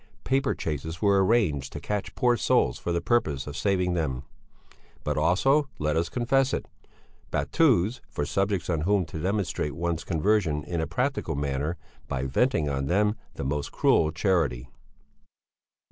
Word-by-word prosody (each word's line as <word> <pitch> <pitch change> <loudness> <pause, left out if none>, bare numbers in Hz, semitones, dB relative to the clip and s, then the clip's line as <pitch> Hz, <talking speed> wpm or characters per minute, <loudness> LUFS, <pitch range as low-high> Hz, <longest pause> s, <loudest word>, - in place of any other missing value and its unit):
Paper 135 +1 +1
chases 80 +2 -4
were 100 -1 +4
arranged 95 - +1
to - - -5
catch 105 -1 -3
poor 120 -1 +3
souls 60 - +2
for 85 - -3
the 85 0 0
purpose 75 - +1
of 75 - -7
saving 90 0 +1
them; 70 -7 -2 0.8
but 75 - -1
also, 135 - +3
let 75 0 0
us 85 +1 0
confess 130 +3 +1
it, - - -4 0.6
battues 115 - +2
for 75 - -2
subjects 95 +1 0
on 80 -4 0
whom 95 +2 +2
to 80 - -7
demonstrate 95 -5 -1
one's 85 -1 -2
conversion 85 -3 +1
in 85 0 -2
a 80 - -2
practical 85 - -1
manner, 70 +4 -2 0.3
by 65 0 -2
venting 80 - +1
on 70 -1 -1
them 105 +5 +2 0.2
the - - -4
most 70 +1 -2
cruel 80 - +3
charity. 80 - 0
85 Hz, 155 wpm, -27 LUFS, 75-105 Hz, 0.8 s, were